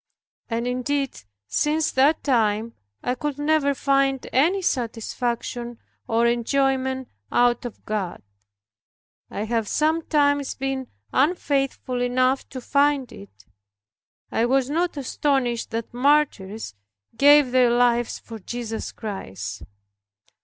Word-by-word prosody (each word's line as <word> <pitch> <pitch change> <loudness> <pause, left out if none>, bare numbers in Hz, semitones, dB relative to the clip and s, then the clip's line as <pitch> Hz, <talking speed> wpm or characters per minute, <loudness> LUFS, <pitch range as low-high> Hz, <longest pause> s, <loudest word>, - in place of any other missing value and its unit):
And 230 0 -1
indeed 260 +2 -2 0.3
since 300 - +1
that 280 +4 +3
time, 225 -4 +1 0.3
I 250 - 0
could 290 +2 -3
never 290 -1 +2
find 275 -1 +1
any 345 +9 +3
satisfaction 240 -2 -2 0.3
or 230 +1 +2
enjoyment 260 +2 +1 0.2
out 240 0 +3
of 240 - -8
God. 205 - -3 1.1
I 205 - -4
have 225 -1 -1
sometimes 295 -2 +1
been 270 -1 -3 0.3
unfaithful 275 -4 0
enough 255 +2 +1
to 260 - -7
find 280 0 +2
it. 95 0 -14 0.9
I 230 - +1
was 265 +1 +1
not 340 +1 0
astonished 265 -3 0
that 230 0 -4
martyrs 245 - +1 0.4
gave 285 +1 +6
their 250 -1 +5
lives 240 0 +2
for 225 -1 -10
Jesus 225 +2 -5
Christ. 105 - -6
255 Hz, 110 wpm, -24 LUFS, 235-280 Hz, 1.1 s, gave